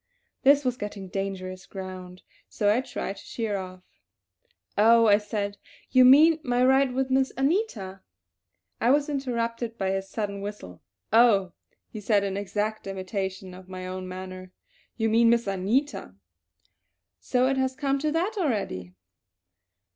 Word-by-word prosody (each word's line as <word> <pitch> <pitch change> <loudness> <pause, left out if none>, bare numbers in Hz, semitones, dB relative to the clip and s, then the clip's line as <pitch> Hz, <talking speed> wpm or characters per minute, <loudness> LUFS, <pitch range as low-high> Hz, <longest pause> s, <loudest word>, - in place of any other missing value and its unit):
This 280 +1 +5
was 250 -1 0
getting 205 -3 -6
dangerous 190 -1 -5
ground, 185 -1 -8 0.3
so 205 -1 +2
I 250 - +1
tried 200 -5 -5
to - - -12
sheer 225 -3 -3
off. 185 -1 -8 0.9
"Oh," 230 +2 +5
I 205 -1 +5
said, 205 -1 -4 0.3
"you 255 -1 +6
mean 305 +5 +7
my 245 -3 0
bike 255 - +5
ride 265 -1 +3
with 265 0 -1
Miss 265 0 +2
Anita" 270 - -1 0.8
I 235 - +2
was 290 +3 +3
interrupted 235 -4 -3
by 190 -1 -1
his 195 0 -3
sudden 200 -2 -4
whistle. 200 - -8 0.3
"Oh," 210 -6 +5 0.3
he 215 - -9
said 205 -1 +2
in 195 -1 -2
exact 205 +2 -3
imitation 190 -1 -4
of 185 0 -13
my 185 0 -7
own 185 0 -5
manner. 185 0 -8 0.5
"You 225 -1 +1
mean 230 +1 +4
Miss 235 0 +3
Anita! 200 - -1 1.0
So 250 0 +1
it 270 0 0
has 260 0 0
come 275 0 0
to 305 +2 -1
that 360 +8 -1
already! 195 - -2
210 Hz, 150 wpm, -26 LUFS, 190-255 Hz, 1.0 s, mean